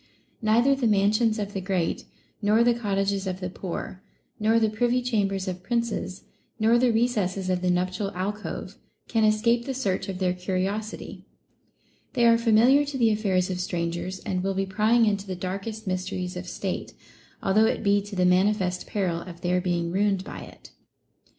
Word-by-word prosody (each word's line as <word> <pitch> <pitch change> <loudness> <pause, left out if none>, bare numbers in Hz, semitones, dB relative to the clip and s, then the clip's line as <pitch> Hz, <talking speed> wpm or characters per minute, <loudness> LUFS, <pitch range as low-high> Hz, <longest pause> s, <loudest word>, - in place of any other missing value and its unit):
Neither 230 +5 +4
the 270 -3 +1
mansions 215 +2 +3
of 205 -1 -4
the 195 - -3
great, 185 -3 -1 0.4
nor 215 +2 +4
the 240 0 +4
cot 210 -4 -2
tages 195 0 0
of 185 0 -3
the 180 -1 -4
poor, 185 0 -6 0.4
nor 220 +2 +3
the 220 - +3
privy 240 +3 +1
chambers 200 -5 0
of 185 -1 -4
princes, 230 -3 -2 0.4
nor 225 +2 +4
the 250 -1 +3
recesses 200 -5 0
of 180 -1 0
the 180 - +1
nuptial 185 +3 0
alcove, 205 +3 -4 0.3
can 225 -2 +1
escape 230 +3 +3
the 270 - -3
search 200 -7 -1
of 190 - -4
their 180 -1 +1
curiosity; 190 +4 -4 0.9
they 240 -3 +3
are 230 0 +6
familiar 235 +5 +5
to 285 -1 -4
the 230 -3 +4
affairs 190 -4 +1
of 180 - -3
strangers, 175 +1 -3
and 185 -1 -2
will 195 +1 -1
be 195 0 0
prying 215 +4 +3
into 200 -2 0
the 185 - -3
darkest 195 +4 -5
mysteries 185 -1 -3
of 180 0 -6
state, 190 +1 -4 0.5
although 210 +3 +4
it - - -1
be 200 -1 +3
to 200 0 -8
the 180 -1 +2
manifest 185 0 +2
peril 180 -5 -1
of 170 -1 -10
their 180 0 +1
being 175 -2 -1
ruined 195 0 +1
by - - -8
it. - - -13
200 Hz, 180 wpm, -26 LUFS, 185-220 Hz, 0.9 s, are